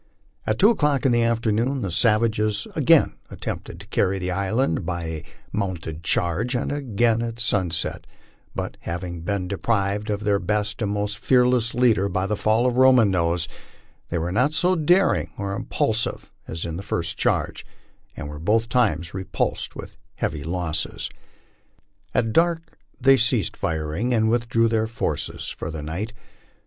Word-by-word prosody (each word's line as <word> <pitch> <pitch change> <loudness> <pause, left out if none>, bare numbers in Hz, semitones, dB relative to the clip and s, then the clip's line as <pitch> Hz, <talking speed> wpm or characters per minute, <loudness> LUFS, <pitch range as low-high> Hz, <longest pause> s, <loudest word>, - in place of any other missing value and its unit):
At - - +1
two 210 +4 +6
o'clock 145 - +1
in 130 - +4
the 120 0 +3
afternoon 115 +3 +1
the 95 - -2
savages 105 +2 +2
again - - +4
attempted - - -6
to - - -11
carry 95 +1 +1
the 90 0 -2
island 100 +2 0
by 85 -2 -3
a 80 -1 -5 0.3
mounted 85 -6 -3
charge, 90 +10 +1
and 125 - -1
again 120 -5 +1
at 115 0 -4
sun 100 -6 +2
%et; 80 0 -2 0.5
but - - -4
having 85 0 -5
been 95 +1 -2
deprived 100 +1 -1
of 105 0 -2
their 100 -1 +2
best 105 +2 -1
and 105 -2 0
most 105 0 -2
fearless 125 -2 +3
leader 110 -6 +3
by 95 0 -1
the 105 +2 0
fall 110 +3 +2
of 125 -1 +1
Roman 130 -5 +6
Nose, 85 -2 +1 0.6
they 85 - -1
were 85 +2 -2
not 130 - +2
so 180 +3 +3
daring 180 +4 +2
or 100 -3 -3
impulsive 110 +3 -1 0.2
as 80 +1 -4
in 85 -1 -4
the - - -5
first 85 -3 -1
charge, - - 0 0.5
and - - -5
were 75 0 -7
both 110 +7 +1
times 105 -9 +1
repulsed 95 -1 -2
with - - -9 0.2
heavy 75 -2 -2
losses. 80 -1 -2 1.0
At 110 -2 +1
dark 165 0 +1 0.2
they 135 +1 +6
ceased 115 -2 +1
firing, 80 +7 -1
and 110 0 +2
withdrew 115 -1 +2
their 110 -1 +1
forces 115 - -2
for - - -5
the 80 -2 -5
night. 90 +9 -4
105 Hz, 160 wpm, -23 LUFS, 90-120 Hz, 1.0 s, two